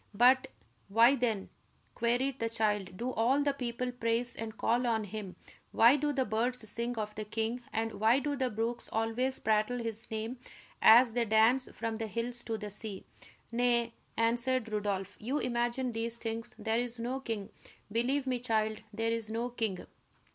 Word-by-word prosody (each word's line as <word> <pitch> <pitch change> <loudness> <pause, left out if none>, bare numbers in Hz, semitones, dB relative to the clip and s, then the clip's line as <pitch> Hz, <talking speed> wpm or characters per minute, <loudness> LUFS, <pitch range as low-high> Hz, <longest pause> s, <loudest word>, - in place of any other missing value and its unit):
"But 255 +4 +5 0.4
why, 230 +6 +5
then," 230 -6 -1 0.4
queried 245 +3 0
the 230 - -1
child, 210 -5 0
"do 245 +4 -2
all 255 +5 +2
the 285 -1 +1
people 250 -1 -3
praise 235 0 -1
and 220 -1 -6
call 245 +2 +1
on 225 -2 +1
him; 205 -2 -7 0.4
why 235 +4 +7
do 295 +1 0
the 265 -2 0
birds 230 +2 0
sing 235 +2 -2
of 210 -1 -3
the 215 +1 -5
king; 225 +3 -2
and 225 0 -2
why 225 +4 +5
do 285 +1 -1
the 260 -2 0
brooks 230 +2 -3
always 225 +4 +1
prattle 215 +3 +1
his 230 -1 -5
name, 225 +3 -4 0.4
as 235 +1 +7
they 240 0 +1
dance 225 +4 +4
from 225 -1 -3
the 225 0 -3
hills 235 +2 +1
to 225 -1 -2
the 210 -1 -6
sea?" 205 -1 -5 0.5
"Nay," 235 -1 +1 0.2
answered 235 +1 +2
Rodolph, 200 -2 -2
"you 255 +7 -2
imagine 240 0 -1
these 230 +1 -1
things; 230 0 -5
there 225 +1 0
is 240 0 -1
no 245 +3 -3
king. 225 -6 -5 0.4
Believe 255 +5 +1
me, 255 -2 -1
child, 220 -2 0
there 225 +2 -1
is 230 -2 +1
no 230 +2 -2
king." 220 -6 -3
230 Hz, 175 wpm, -31 LUFS, 220-245 Hz, 0.5 s, why